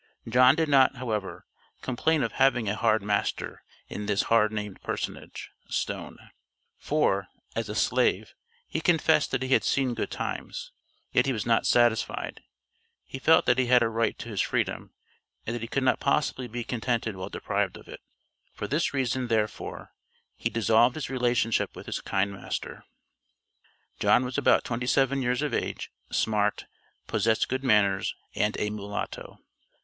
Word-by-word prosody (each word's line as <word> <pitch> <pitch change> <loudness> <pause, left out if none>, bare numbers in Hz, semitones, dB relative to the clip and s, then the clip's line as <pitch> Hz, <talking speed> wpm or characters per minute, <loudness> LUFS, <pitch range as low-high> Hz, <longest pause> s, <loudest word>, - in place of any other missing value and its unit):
John 125 +3 +6
did 160 0 +1
not, 135 -2 +5
however, 110 -6 -4 0.4
complain 150 +5 +1
of - - -1
having 125 -4 +2
a 105 - 0
hard 110 -2 +2
master 105 0 -2 0.3
in 105 - -6
this 105 -1 +2
hard 110 -2 +3
named 105 -2 -5
personage, - - -5 0.2
(Stone); - - -3 0.6
for, 100 -11 +1 0.3
as - - -2
a - - -4
slave, - - +1 0.3
he 160 - -3
confessed 160 -2 +3
that 135 -1 -1
he 130 - -3
had 135 - +4
seen 130 -3 +1
good - - -3
times. - - -5 0.4
Yet - - +3
he - - +2
was 110 - -3
not 115 -1 +2
satisfied; 120 -2 +1 0.6
he 135 - -7
felt 160 +4 +5
that 125 +1 +3
he 130 - +2
had 125 -1 +5
a 115 - +1
right 115 0 0
to - - -8
his - - -1
freedom, - - -2 0.5
and 115 - -3
that 120 - -5
he 115 - -4
could 135 +3 -1
not 130 - +2
possibly 140 -3 0
be 120 +1 -5
contented 115 -2 -2
while 95 0 -6
deprived - - -2
of - - -15
it, - - -10 0.5
for 105 - -4
this 150 +2 0
reason, 130 -1 0
therefore, 110 -2 -2 0.4
he - - -2
dissolved 115 +2 +3
his 150 -4 -4
relationship 120 -3 +1
with - - -9
his - - -4
kind 100 +1 0
master. 95 - -6 1.1
John 125 - +4
was 125 0 -5
about 145 - +4
twenty 120 +1 -3
seven 135 +1 +2
years 125 +3 0
of 150 - -2
age, - - -3 0.2
smart, 105 -1 0 0.4
possessed 110 +1 +1
good 130 +1 -2
manners, 100 -6 +2 0.2
and 105 +1 0
a 105 - -1
mulatto. 105 -1 -6
120 Hz, 165 wpm, -27 LUFS, 110-130 Hz, 1.1 s, John